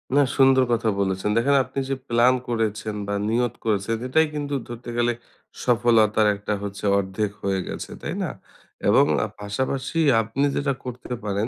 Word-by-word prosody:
না, 145 - +6 0.2
সুন্দর 130 -1 +6
কথা 115 -1 +1
বলেছেন। 95 +1 0
দেখেন 140 +4 +3
আপনি 135 - -5
যে, 135 - 0
প্ল্যান 120 +2 +4
করেছেন 110 -2 -2
বা 100 - -1
নিয়ত 120 0 +1
করেছেন, 105 +1 0
এটাই 160 +5 +3
কিন্তু 145 -1 -3
ধরতে 120 0 -8
গেলে 120 0 +2 0.5
সফলতার 115 -3 +3
একটা 105 +1 -3
হচ্ছে 100 +1 -5
অর্ধেক 100 +1 -1
হয়ে 95 -1 0
গেছে। - - -6
তাই - - -4
না? - - -2 0.6
এবং - - +6 0.2
আ - - -1
পাশাপাশি 130 +9 -2 0.2
আপনি 115 +6 -1
যেটা 140 -1 0
করতে 125 0 -6
পারেন 100 +1 -1
115 Hz, 160 wpm, -24 LUFS, 105-130 Hz, 0.6 s, না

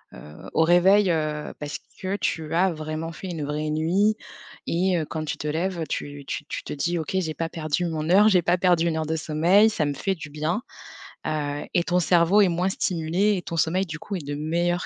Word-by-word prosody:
heu, 75 0 -11
au - - +3
réveil, 185 +4 +5
heu, 155 -2 -2
parce 150 -1 -5 0.2
que 190 +2 -2
tu 160 -5 -2
as 185 +2 +3
vraiment 155 +1 -5
fait 190 - -7
une 160 -4 -4
vraie 150 +1 -2
nuit 185 +8 +2 0.5
et 180 +1 +1
heu, 155 - -2
quand 155 +1 -4
tu - - -3
te 150 - -5
lèves, 170 +2 -1
tu 145 -1 -4
tu 150 - -4
tu - - -5
te - - -5
dis: 170 +4 -1
«OK, 160 +4 -2
j'ai 160 -4 -2
pas 165 0 -2
perdu 160 +2 -2
mon 160 -1 -3
heure, 205 +3 +7
j'ai 185 -4 +4
pas 175 +1 +2
perdu 175 -2 +3
1 160 -1 0
heure 160 - -1
de 160 - 0
sommeil, 170 +8 +4
ça 155 -7 0
me 145 - -1
fait 195 +7 -1
du 155 -4 -9
bien!», 155 +8 -2 0.7
heu, 145 -1 -2
et 175 -2 +3
ton 180 0 +1
cerveau 175 +3 +4
est 195 - +5
moins 175 +2 0
stimulé 185 +3 0
et - - -3
ton 170 - -5
sommeil 180 +4 +1
du 155 -3 -6
coup 205 - -5
est 160 - -8
de 145 - -3
meilleure 170 +4 0
165 Hz, 230 wpm, -25 LUFS, 155-180 Hz, 0.7 s, heure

